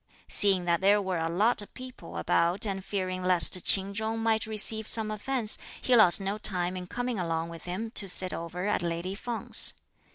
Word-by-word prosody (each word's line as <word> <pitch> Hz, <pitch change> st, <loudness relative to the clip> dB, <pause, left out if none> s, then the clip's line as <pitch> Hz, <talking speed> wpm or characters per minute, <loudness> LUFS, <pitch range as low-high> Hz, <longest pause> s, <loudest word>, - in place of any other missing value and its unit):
Seeing 195 Hz, -3 st, 0 dB
that 170 Hz, 0 st, 0 dB
there 200 Hz, +2 st, +3 dB
were 190 Hz, -3 st, -3 dB
a 165 Hz, 0 st, -2 dB
lot 210 Hz, +7 st, +1 dB
of 205 Hz, -, -14 dB
people 255 Hz, -, -11 dB
about 170 Hz, -, 0 dB
and 195 Hz, -2 st, -4 dB
fearing 185 Hz, -2 st, -4 dB
lest 180 Hz, 0 st, +3 dB
Ch'in 195 Hz, 0 st, +4 dB
Chung 220 Hz, +2 st, -3 dB
might 225 Hz, -1 st, -1 dB
receive 220 Hz, 0 st, 0 dB
some 220 Hz, -1 st, +5 dB
offence, 225 Hz, +1 st, +3 dB, 0.2 s
he 255 Hz, -, +1 dB
lost 210 Hz, -6 st, +6 dB
no 200 Hz, +2 st, -4 dB
time 180 Hz, -3 st, +1 dB
in 180 Hz, -1 st, -7 dB
coming 245 Hz, 0 st, -4 dB
along 165 Hz, -1 st, -3 dB
with 165 Hz, 0 st, -11 dB
him 200 Hz, +6 st, -6 dB
to 195 Hz, -4 st, -2 dB
sit 185 Hz, 0 st, -2 dB
over 170 Hz, +2 st, -6 dB
at 210 Hz, -, -1 dB
lady 170 Hz, +2 st, -4 dB
Feng's. 230 Hz, +3 st, 0 dB
195 Hz, 195 wpm, -27 LUFS, 180-220 Hz, 0.2 s, lost